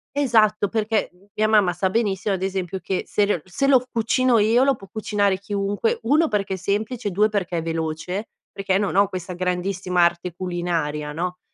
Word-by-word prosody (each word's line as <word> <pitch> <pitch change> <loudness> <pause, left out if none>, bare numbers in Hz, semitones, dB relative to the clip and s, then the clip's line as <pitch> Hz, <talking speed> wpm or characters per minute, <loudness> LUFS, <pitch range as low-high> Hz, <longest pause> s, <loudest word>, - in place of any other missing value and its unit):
Esatto, 220 -7 +3
perché, 220 -1 0
mhmm, 180 +2 -25
mia 215 0 +1
mamma 205 -5 +4
sa 185 +2 0
benissimo 200 -2 0
ad 185 - -5
esempio 190 -1 -2
che 185 0 -2
se 205 - +2
le 205 - +1
o - - 0
l - - -14
se 190 +9 -2
lo 260 -3 +5
cucino 235 +2 +2
io 225 +4 +4
lo 275 0 +3
può 195 -4 -14
cucinare 205 -2 0
chiunque, 200 +2 -1
1 300 +8 +3
perché 200 -6 -1
è 190 - -3
semplice 210 +5 -2
e - - -1
2 210 +4 +3
perché 185 -5 -2
è - - -1
veloce, 165 +5 -3 0.2
perché 195 -1 0
non 200 -2 -1
ho 200 0 +5
questa 185 -1 -6
grandissima 180 0 0
arte 170 0 0
culinaria, 170 -5 -2
no. 180 +3 -3
195 Hz, 205 wpm, -23 LUFS, 180-215 Hz, 0.2 s, lo